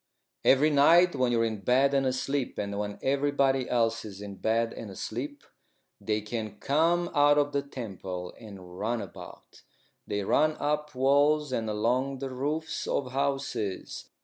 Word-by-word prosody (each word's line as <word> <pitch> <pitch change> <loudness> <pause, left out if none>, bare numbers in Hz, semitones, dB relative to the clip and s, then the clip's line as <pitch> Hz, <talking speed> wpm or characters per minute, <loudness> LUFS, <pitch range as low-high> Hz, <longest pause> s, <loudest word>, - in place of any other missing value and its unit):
"Every 145 +3 +5
night 170 +5 +6
when 130 -3 +1
you're 115 -1 +2
in 110 -2 -3
bed 130 +6 +3
and 135 -1 +2
asleep, 130 +1 -2
and 100 0 -3
when 105 0 -4
everybody 135 -1 +1
else 115 -2 +1
is 100 -2 -9
in 100 -1 -8
bed 115 +4 0
and 110 - -8
asleep, 130 +9 -6 0.6
they 105 -1 -1
can 105 -1 -5
come 170 +7 +1
out 145 -1 +5
of 145 0 +2
the 140 - 0
temple 95 -9 -7
and 95 -5 -11
run 115 +3 -1
about. 100 -5 -11 0.5
They 100 0 -2
run 155 +9 +2
up 150 0 -1
walls 145 +2 +3
and 115 -3 -1
along 125 +6 0
the 135 0 -5
roofs 150 +5 -3
of 130 -3 -1
houses. 135 -7 -3
130 Hz, 155 wpm, -28 LUFS, 110-145 Hz, 0.6 s, night